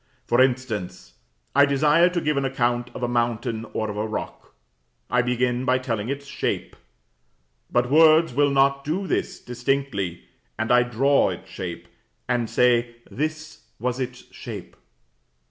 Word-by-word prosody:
For 120 Hz, +2 st, +3 dB
instance: 110 Hz, -, -1 dB, 0.4 s
I 140 Hz, 0 st, +6 dB
desire 150 Hz, +5 st, +4 dB
to 180 Hz, -1 st, -1 dB
give 150 Hz, -1 st, 0 dB
an 140 Hz, -, 0 dB
account 120 Hz, -2 st, 0 dB
of -, -, -6 dB
a -, -, +1 dB
mountain 120 Hz, -1 st, -1 dB
or 110 Hz, -, -2 dB
of 105 Hz, -1 st, -5 dB
a 105 Hz, +1 st, -1 dB
rock; 110 Hz, -, -6 dB, 0.6 s
I 125 Hz, -, +4 dB
begin 125 Hz, 0 st, 0 dB
by 130 Hz, 0 st, +3 dB
telling 115 Hz, -4 st, -3 dB
its 140 Hz, +1 st, -4 dB
shape. -, -, -3 dB, 1.0 s
But 120 Hz, +1 st, +1 dB
words 160 Hz, -1 st, +6 dB
will 145 Hz, +2 st, +3 dB
not 140 Hz, 0 st, +2 dB
do 170 Hz, +7 st, -2 dB
this -, -, -2 dB
distinctly, 120 Hz, -7 st, -2 dB, 0.3 s
and 110 Hz, +2 st, -1 dB
I 125 Hz, 0 st, +6 dB
draw 125 Hz, +4 st, +2 dB
its -, -, -8 dB
shape, 85 Hz, -2 st, -6 dB, 0.4 s
and 120 Hz, -2 st, 0 dB
say, 120 Hz, -1 st, +2 dB, 0.2 s
"This 155 Hz, +2 st, -4 dB
was 125 Hz, +2 st, -2 dB
its 125 Hz, -1 st, -5 dB
shape." -, -, -8 dB
125 Hz, 150 wpm, -24 LUFS, 120-140 Hz, 1.0 s, I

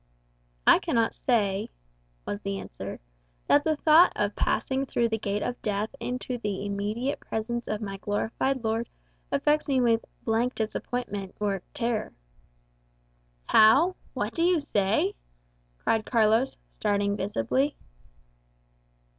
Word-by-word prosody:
"I -, -, +7 dB
cannot 235 Hz, -9 st, +1 dB
say," 205 Hz, -5 st, 0 dB, 0.6 s
was 205 Hz, -, -3 dB
the 200 Hz, -1 st, -3 dB
answer, -, -, -7 dB, 0.5 s
"that 290 Hz, -, +4 dB
the 315 Hz, 0 st, +1 dB
thought 315 Hz, +4 st, +6 dB
of -, -, -1 dB
passing 265 Hz, 0 st, 0 dB
through 235 Hz, -2 st, +1 dB
the 220 Hz, 0 st, -1 dB
gate 205 Hz, 0 st, -2 dB
of 245 Hz, -, -4 dB
death 210 Hz, +1 st, -1 dB
into 250 Hz, 0 st, -3 dB
the 205 Hz, -2 st, -3 dB
immediate 210 Hz, +7 st, -2 dB
presence 235 Hz, +2 st, -3 dB
of 215 Hz, 0 st, -2 dB
my 195 Hz, -1 st, -5 dB
glorified 225 Hz, +6 st, -1 dB
Lord 225 Hz, +1 st, -1 dB, 0.4 s
affects 300 Hz, +1 st, +2 dB
me 265 Hz, -2 st, +3 dB
with 230 Hz, -2 st, +3 dB, 0.2 s
'blank 235 Hz, +3 st, +1 dB
disappointment' 215 Hz, -3 st, -3 dB
or 200 Hz, -3 st, -1 dB
'terror.'" 235 Hz, -5 st, -1 dB, 1.3 s
"How? 275 Hz, +13 st, +6 dB, 0.2 s
What -, -, -2 dB
do 330 Hz, -, -2 dB
you 350 Hz, 0 st, +4 dB
say?" 200 Hz, -9 st, +1 dB, 0.6 s
cried 220 Hz, -, 0 dB
Carlos, 225 Hz, +2 st, +3 dB
starting 205 Hz, -1 st, 0 dB
visibly. 205 Hz, -, 0 dB
225 Hz, 125 wpm, -27 LUFS, 205-255 Hz, 1.3 s, I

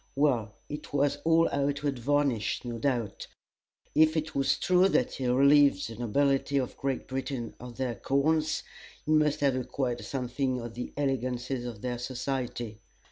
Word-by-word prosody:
Well, 125 Hz, -7 st, +1 dB
it 150 Hz, 0 st, -7 dB
was 145 Hz, 0 st, +2 dB
all 165 Hz, 0 st, +4 dB
outward 140 Hz, -1 st, -1 dB
varnish, 135 Hz, -3 st, 0 dB
no 120 Hz, -1 st, -4 dB
doubt. 120 Hz, -4 st, -1 dB, 0.7 s
If 155 Hz, +1 st, +4 dB
it 155 Hz, 0 st, -2 dB
was 135 Hz, 0 st, +2 dB
true 185 Hz, +1 st, +4 dB
that 125 Hz, -, +2 dB
he 130 Hz, -, -4 dB
had 125 Hz, 0 st, +2 dB
relieved 140 Hz, +1 st, +5 dB
the 115 Hz, -, -8 dB
nobility 135 Hz, +4 st, +1 dB
of 130 Hz, -3 st, -1 dB
Great 135 Hz, -2 st, -3 dB
Britain 130 Hz, -3 st, -4 dB
of 120 Hz, -1 st, -9 dB
their 130 Hz, -2 st, -1 dB
corns, 155 Hz, +5 st, +1 dB, 0.4 s
he 155 Hz, -, -1 dB
must 150 Hz, -2 st, +3 dB
have 140 Hz, -2 st, +3 dB
acquired 125 Hz, -1 st, -2 dB
something 130 Hz, 0 st, -2 dB
of 120 Hz, -1 st, -6 dB
the 125 Hz, +1 st, -5 dB
elegances 130 Hz, -2 st, -1 dB
of 115 Hz, -3 st, -8 dB
their 125 Hz, -1 st, -2 dB
society. 125 Hz, -3 st, -4 dB
135 Hz, 160 wpm, -29 LUFS, 120-145 Hz, 0.7 s, relieved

